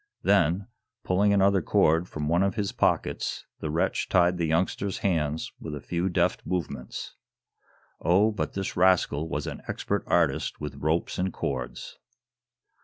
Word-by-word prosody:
Then, 95 -1 +3 0.4
pulling 100 +3 +2
another 100 -1 +4
cord 80 +2 +2
from 75 -1 -4
one 85 +3 +2
of 100 0 +1
his 105 -3 -1
pockets, - - 0
the 75 - -3
wretch 80 +3 0
tied 90 0 +3
the 85 - +1
youngster's 90 +4 0
hands 80 -4 0
with 75 -2 -6
a - - -5
few 85 +5 -2
deft 90 0 +1
movements. 70 -8 -4 0.9
Oh, 95 +7 +4
but 105 - -3
this 95 -1 -3
rascal 90 -4 +3
was - - -2
an - - -6
expert - - -2
artist - - +1
with 75 -2 -6
ropes 80 +5 -1
and 95 +1 0
cords. 65 -6 -5
85 Hz, 150 wpm, -27 LUFS, 80-95 Hz, 0.9 s, another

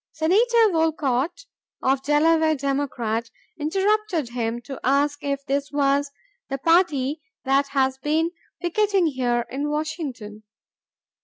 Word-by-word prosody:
Senator 440 +7 +3
Wolcott 320 - 0 0.4
of 265 0 +2
Delaware, 315 +2 +3
Democrat, 260 -5 -2 0.3
interrupted 385 - 0
him 235 -1 -2
to 270 0 -8
ask 285 +2 +1
if 280 -1 -2
this 280 0 -1
was 285 0 +1 0.4
"the 275 - -2
party 310 -2 +2 0.2
that 275 +1 +2
has 265 -1 0
been 315 +4 0 0.3
picketing 390 +1 +1
here 245 -5 0
in 285 +3 -2
Washington?" 280 -9 -4
285 Hz, 110 wpm, -23 LUFS, 265-325 Hz, 0.4 s, Senator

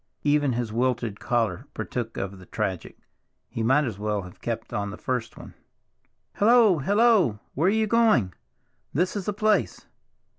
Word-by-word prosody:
Even 145 -2 +2
his 115 -2 -3
wilted 120 -3 -1
collar 115 -7 -1
partook 115 -2 -4
of 95 0 -5
the 90 - -14
tragic; 95 -3 -4 0.5
he 115 - -5
might 135 +7 +3
as 110 -7 -4
well 105 -1 -2
have 90 -1 -13
kept - - -4
on 100 0 -2
the 105 - -8
first 125 -3 -3
one. - - -11 0.8
"Hello! 220 -5 +5
Hello! 205 - +3 0.2
Where 160 +6 +1
are - - +6
you 220 +2 +2
going? 215 - +3 0.6
This 180 +6 +1
is 200 -3 -3
the 210 - -1
place." 215 +1 0
125 Hz, 160 wpm, -25 LUFS, -, 0.8 s, are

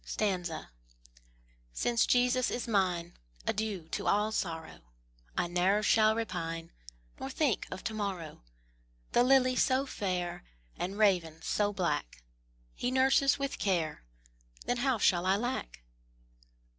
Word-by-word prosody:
Since 235 - +1
Jesus 250 0 +3
is 240 - -3
mine, 180 -5 0 0.3
Adieu 205 -6 -2
to - - -3
all 210 +2 +2
sorrow; 165 -6 -4 0.6
I - - +2
ne'er 180 +4 +2
shall 215 +1 +4
repine, 170 -7 -4 0.5
Nor 265 - -4
think 270 - 0
of 185 - -7
to 220 - -3
morrow: 190 - -4 0.7
The 240 - +4
lily 255 0 +4
so 260 +2 +2
fair, 180 - -3 0.3
And 190 +3 -4
raven 175 -7 +2
so 205 -1 +1
black, 170 - -2 0.5
He 245 - -2
nurses 265 +1 +4
with 275 -1 -3
care, 170 - 0 0.6
Then 245 - 0
how 255 0 +1
shall 180 -3 +3
I 190 - +4
lack? 210 - -3
205 Hz, 120 wpm, -31 LUFS, 175-245 Hz, 0.7 s, shall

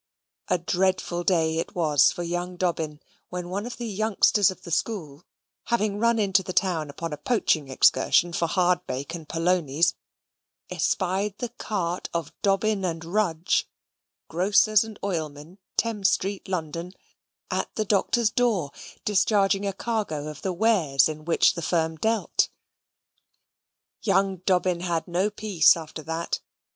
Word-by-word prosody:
A - - +2
dreadful 180 0 0
day 165 -3 +2
it - - -5
was 155 -5 +4
for 175 - -5
young 175 +1 -3
Dobbin 160 -4 -2 0.3
when 180 -1 -5
one 200 +5 -3
of 245 - -7
the 240 - -5
youngsters 210 -1 +3
of 185 -1 -8
the 170 - -9
school, 165 -5 -3 0.4
having 215 -3 0
run 235 +1 +3
into 195 -3 +3
the 185 -1 -6
town 170 -7 0
upon 160 +3 -5
a - - -5
poaching 160 - +1
excursion 170 +5 +3
for 170 - 0
hardbake 175 -5 0
and 165 -3 -8
polonies, 165 -1 +1 0.8
espied 195 +2 0
the 245 - -4
cart 190 -7 -3
of 170 -3 -3
Dobbin 200 +1 +1 0.2
& - - -11
Rudge, 175 -2 0 0.6
Grocers 200 +5 +3
and 220 -2 -9
Oilmen, 160 -1 -4 0.2
Thames 210 -4 +2
Street, 195 +1 -2
London, 170 0 -4 0.6
at - - -1
the 215 - -1
Doctor's 215 +3 +2
door, 220 - +1 0.3
discharging 200 -1 +2
a - - 0
cargo 195 -9 -3
of 150 - -9
the 190 - -1
wares 175 - +3
in 155 -1 -7
which 170 - +4
the 170 - -5
firm 160 -1 0
dealt. 220 +5 +1 1.5
Young 195 -2 +1
Dobbin 180 -2 +2
had 170 -1 -2
no 180 +4 +1
peace 205 -7 +4
after 160 -1 -8
that. 165 +2 -3
180 Hz, 145 wpm, -25 LUFS, 165-205 Hz, 1.5 s, was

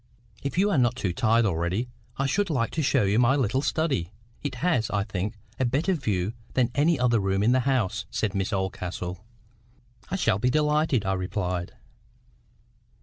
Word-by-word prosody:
"If 140 +3 -4
you 205 +2 +3
are 155 - +3
not 120 0 +3
too 100 -8 -2
tired 115 +4 +3
already, 90 +5 0 0.3
I 135 - 0
should 195 +8 +1
like 130 -7 0
to 160 - -1
show 135 -4 +3
you 100 +3 +2
my 125 +2 +4
little 130 -1 +1
study. 145 - 0 0.3
It 140 -3 -3
has, 125 -6 +1
I 100 -1 0
think, 105 +1 -3 0.2
a 130 - +2
better 145 +10 +1
view 105 - -1 0.2
than 125 -2 +2
any 150 +1 +2
other 120 -2 +3
room 95 0 +1
in 115 - +4
the 130 - +4
house," 125 -8 0
said 105 - -1
Miss 100 +1 -1
Oldcastle. 90 -2 -3 0.9
"I 195 - -1
shall 140 - +1
be 125 +3 +2
delighted," 150 -4 +2
I 95 - +1
replied. 90 -1 -2
120 Hz, 180 wpm, -26 LUFS, 95-140 Hz, 0.9 s, my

